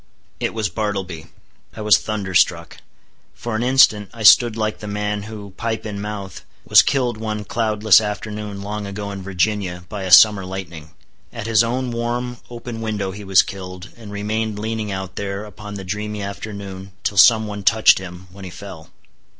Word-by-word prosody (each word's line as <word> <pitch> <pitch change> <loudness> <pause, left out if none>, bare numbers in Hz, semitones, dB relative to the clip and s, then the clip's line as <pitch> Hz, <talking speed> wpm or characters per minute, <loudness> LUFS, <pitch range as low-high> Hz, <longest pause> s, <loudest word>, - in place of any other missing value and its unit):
It - - -2
was 110 -2 0
Bartleby. 90 -4 -4 0.5
I - - -7
was 105 -4 +5
thunderstruck. 100 -5 0 0.6
For 120 -2 -4
an 110 - -1
instant 120 -5 +4
I 115 - -6
stood 115 +1 +7
like 110 -1 -2
the 105 - -7
man 105 0 -2
who, 105 -2 -9
pipe 115 -1 -3
in 100 -2 -5
mouth, 100 -4 -6 0.2
was - - +7
killed 125 -4 0
one 110 -1 -4
cloudless 110 -2 +3
afternoon 105 -1 -5
long 105 0 -4
ago 100 +1 -5
in 100 -1 -6
Virginia, 95 -1 -1
by 105 - -5
a - - -3
summer 105 +2 +8
lightning; 90 -4 -7 0.4
at 110 - -7
his 115 0 +4
own 125 +2 -2
warm 120 +1 -3
open 120 -1 -7
window 105 -3 -2
he 100 +2 -9
was 95 -2 +5
killed, 95 0 -8
and 110 -3 -11
remained 105 +1 -2
leaning 110 0 -3
out 95 -1 -6
there 100 +1 -4
upon 105 0 -9
the 100 - -6
dreamy 105 +2 -4
afternoon, 100 -1 -7
till 100 - -2
some 110 +2 +7
one 105 -1 -6
touched 110 +1 +5
him, 90 0 -9
when 95 +1 -12
he 95 - -7
fell. 90 -4 -10
105 Hz, 175 wpm, -20 LUFS, 95-110 Hz, 0.6 s, summer